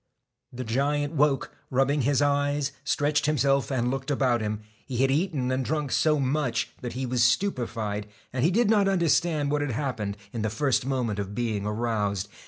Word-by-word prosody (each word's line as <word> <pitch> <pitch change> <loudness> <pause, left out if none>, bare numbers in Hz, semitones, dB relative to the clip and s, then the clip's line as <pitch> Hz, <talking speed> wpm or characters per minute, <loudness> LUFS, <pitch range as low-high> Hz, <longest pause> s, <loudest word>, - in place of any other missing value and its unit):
The 125 +1 -5
giant 145 +5 0
woke, 145 -2 +1
rubbed 135 +3 +2
his 145 0 +3
eyes, 145 0 +1
stretched 145 0 +1
him 150 0 +2
self, 135 -3 +2
and 125 -2 0
looked 135 +1 -4
about 130 -4 +2
him. 105 0 -2 0.3
He 125 - -4
had 135 +2 +3
eaten 145 -4 0
and 130 0 0
drunk 150 0 -2
so 155 -1 +3
much 130 -3 0
that 120 - -5
he 130 +1 -3
was 125 -1 +1
stupefied, 115 - 0 0.3
and 125 -1 0
he 160 - +5
did 225 +5 +2
not 205 -2 +4
understand 165 -5 +2
what 150 0 +1
had 145 - -1
happened, 110 -6 -3 0.2
in 115 - -3
the 110 - 0
first 125 +3 0
moment 120 -6 -1
of 100 0 -4
being 110 -4 -1
aroused. 105 -3 -1
135 Hz, 190 wpm, -26 LUFS, 115-145 Hz, 0.3 s, he